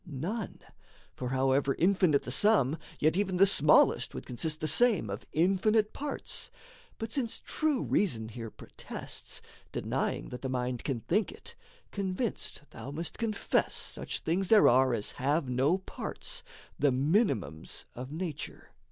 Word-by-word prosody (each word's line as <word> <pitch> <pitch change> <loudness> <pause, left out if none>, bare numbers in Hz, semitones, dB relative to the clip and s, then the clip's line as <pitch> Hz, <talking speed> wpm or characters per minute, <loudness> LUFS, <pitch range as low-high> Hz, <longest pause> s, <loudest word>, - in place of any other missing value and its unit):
None: 175 - -4 0.5
for 125 - -4
however 135 +1 +2
infinite 180 -5 +3
the 125 - -4
sum, 155 - +3 0.2
Yet 155 +2 +3
even 190 -2 0
the 195 - +7
smallest 150 -6 +4
would - - -6
consist 155 +5 -2
the 155 - -1
same 190 - +3
Of 100 - -6
infinite 195 +6 +2
parts. 290 0 -1 0.5
But 225 0 -5
since 240 -4 0
true 310 -4 0
reason 115 - +1
here 115 0 -6
Protests, - - -8 0.3
denying - - -2
that 125 - -7
the 130 - -3
mind 125 -1 -2
can 130 -5 -2
think 205 - +1
it, 440 - -11 0.4
Convinced 195 -2 -2
thou - - -8
must 160 +4 -5
confess 220 -3 0
such - - -4
things 180 +4 0
there 215 0 +7
are 130 0 +5
As 105 -2 -1
have 145 0 +2
no 130 +8 +2
parts, 190 - -5 0.4
the 145 -1 +4
minimums 130 - 0
of 130 +3 -7
nature. 155 -2 -6
155 Hz, 145 wpm, -30 LUFS, 130-200 Hz, 0.5 s, the